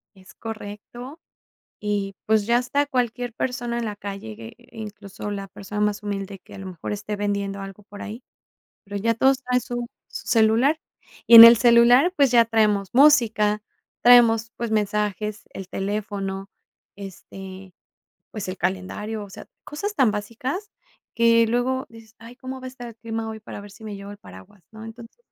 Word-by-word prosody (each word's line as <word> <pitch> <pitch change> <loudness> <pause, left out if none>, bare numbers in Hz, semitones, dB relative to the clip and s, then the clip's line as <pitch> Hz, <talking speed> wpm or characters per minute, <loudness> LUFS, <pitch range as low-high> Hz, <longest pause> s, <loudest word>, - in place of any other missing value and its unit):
Es 185 -1 -17
correcto, 225 +6 -9 0.6
y 205 -2 -2
pues, 215 -1 +2
ya 235 +1 +3
hasta 280 +4 0
cualquier 245 -3 -2
persona 240 -1 -3
en 235 - -3
la 210 -1 -4
calle 195 - -7
gue 115 - -10
eh, - - -22
incluso 205 -2 -8
la 195 -1 -5
persona 200 +2 -7
más 210 0 0
humilde 200 -1 -5
que 180 - -17
a - - -9
lo 195 - -8
mejor 180 -3 -7
esté 210 0 -4
vendiendo 200 -1 -2
algo 195 +1 -10
por 205 0 -12
ahí, 225 +4 -8 0.6
pero, 200 0 -7
ya 230 +3 +1
todos 265 +3 +3
traen 250 0 +1
su 240 0 -5 0.2
celular. 230 +8 +2 0.5
Y 235 - +7
en 230 - +14
el 230 +1 +10
celular, 240 +8 +5
pues, 280 -4 +4
ya 235 -1 +6
traemos 210 -3 +1
música, 225 -7 +4 0.4
traemos, 230 -2 +6
pues, 235 -1 -4
mensajes, 210 0 -1
el 190 -1 -8
teléfono, 195 -1 -4 0.5
este, 190 -1 -10 0.6
pues, 210 -4 -6
el 185 - -4
calendario, 200 +4 -3
o 200 - -14
sea, - - -11 0.2
cosas 400 +8 -5
tan 260 - +3
básicas 235 - -4 0.4
que 230 0 +4
luego 255 +2 0
dices: 225 -1 -16
"Ay, 230 +2 -13
¿cómo 260 0 -7
va 255 - -8
a - - -4
estar 250 -1 -10
el 230 - -12
clima 225 0 -5
hoy 220 0 -7
para 205 - -9
ver 205 0 -12
si 220 - -16
me 210 -2 -6
llevo 200 +1 -9
el 205 - -12
paraguas?·, 95 - -15
¿no? 220 0 -11
Entonces, 230 - -12
220 Hz, 180 wpm, -23 LUFS, 200-240 Hz, 0.6 s, en